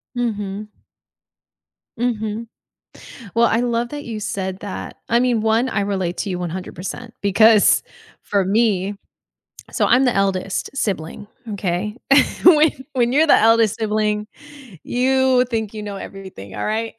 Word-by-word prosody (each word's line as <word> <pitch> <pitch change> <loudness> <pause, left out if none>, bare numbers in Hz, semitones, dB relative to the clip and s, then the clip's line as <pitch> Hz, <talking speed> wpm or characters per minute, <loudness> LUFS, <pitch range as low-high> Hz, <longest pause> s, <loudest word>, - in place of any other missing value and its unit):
Mhm. 210 -4 -3 1.3
Mhm. 225 -2 -2 0.9
Well, 235 0 +5
I 225 - +1
love 240 0 -1
that 290 0 -7
you 225 -2 -5
said 195 -3 -4
that. 205 -2 -7
I 235 - +4
mean, 245 -3 +1
1, 225 +3 +2
I 210 - -1
relate 190 -3 -2
to 205 - -2
you 180 -1 -3
100%, 180 +6 -6
because 210 +2 +5 0.4
for 200 -2 0
me 205 -1 +1 0.8
so - - +1
I'm 255 +3 +4
the 250 - +2
eldest 195 -1 -1
sibling, 200 -6 -3 0.3
okay? 195 +2 -2 0.5
When 310 -3 +7 0.2
when 245 -2 +1
you're 310 +3 +4
the - - +7
eldest 225 -1 +4
sibling, 210 -1 0 0.6
you 260 0 +2
think 225 -4 -3
you 215 -1 -6
know 205 -1 -6
everything, 190 - -10
all - - -3
right? 225 +1 -2
215 Hz, 140 wpm, -20 LUFS, 195-235 Hz, 1.3 s, When